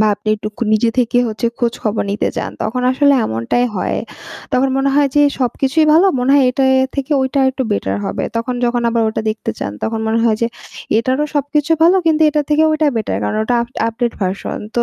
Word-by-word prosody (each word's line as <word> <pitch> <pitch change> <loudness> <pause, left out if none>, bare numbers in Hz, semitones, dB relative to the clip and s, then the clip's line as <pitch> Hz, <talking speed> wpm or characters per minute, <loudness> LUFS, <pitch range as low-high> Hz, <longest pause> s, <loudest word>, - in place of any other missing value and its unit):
বা 215 - +4
আপনি 210 +2 -8
একটুক 215 0 -7 0.2
নিজে 220 +2 +2
থেকে 245 0 +2
হচ্ছে 215 +1 -2
খোঁজখবর 230 -3 -1
নিতে 205 - -1
যান - - -3
তখন 250 +4 -2
আসলে 280 +2 +3
এমনটাই 115 - -1
হয়। - - -1 0.6
তখন 260 +2 +2
মনে 270 +1 +1
হয় 285 0 +3
যে 290 - +4
এ - - -5
সবকিছুই 270 +5 +1
ভালো, 345 +5 +5
মনে 250 +2 +1
হয় 280 - +5
এটা 270 +2 -1
এ - - +4 0.2
থেকে 275 +2 -2
ওইটা 265 +2 -1
আরেকটু 265 0 0
বেটার 95 - -1
হবে। 95 - -3
তখন 235 +2 -2
যখন 240 0 0
আবার 230 0 +1
ওটা 220 - -3
দেখতে 215 - -4
চান, 100 - -4
তখন 225 0 -2
মনে 225 +1 +1
হয় 220 -2 +2
যে - - +3 0.5
এটারও 260 +5 0
সবকিছু 290 +2 -1
ভালো, 345 +3 +5
কিন্তু 320 0 +3
এটার 300 0 0
থেকে 300 +1 +3
ওইটা 310 0 +1
বেটার। 215 - -2
কারণ 105 - -2
ওটা 245 - 0
আফ 235 - -8 0.2
আপডেট 235 +1 -2
ভার্সন। 190 +1 -3 0.2
তো 240 - +3
245 Hz, 215 wpm, -17 LUFS, 220-280 Hz, 0.6 s, ভালো